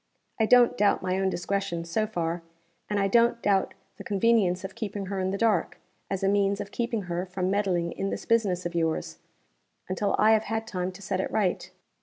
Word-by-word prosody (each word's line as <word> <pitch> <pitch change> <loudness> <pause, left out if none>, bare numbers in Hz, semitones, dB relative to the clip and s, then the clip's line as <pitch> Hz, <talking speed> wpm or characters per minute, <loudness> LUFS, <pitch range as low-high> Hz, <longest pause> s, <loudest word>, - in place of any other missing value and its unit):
I 220 - +3
don't 245 0 +5
doubt 205 -2 +3
my 185 0 0
own 190 0 +1
discretion, 180 -2 -2
so 215 +6 -1
far; 170 -4 -2 0.5
and 205 -1 0
I 195 - +2
don't 235 +3 +3
doubt 195 -2 +1 0.2
the - - -8
convenience 200 -3 +2
of 190 0 -6
keeping 205 -2 -4
her 195 0 -3
in 185 0 0
the 195 - -2
dark, 215 -5 +1 0.3
as 195 0 -3
a - - +3
means 200 0 +2
of 205 -1 -6
keeping 235 -3 -2
her 175 0 -3
from 185 0 -2
meddling 185 -4 0
in 195 - -3
this - - -5
business 200 -6 +1
of 175 - -3
yours, 160 - -1 0.7
until 195 +2 0
I 215 +1 +5
have 220 0 +3
had 225 +1 -2
time 185 -3 -3
to 195 +2 -12
set 190 0 -1
it - - -3
right. 195 -5 0
195 Hz, 210 wpm, -27 LUFS, 180-215 Hz, 0.7 s, don't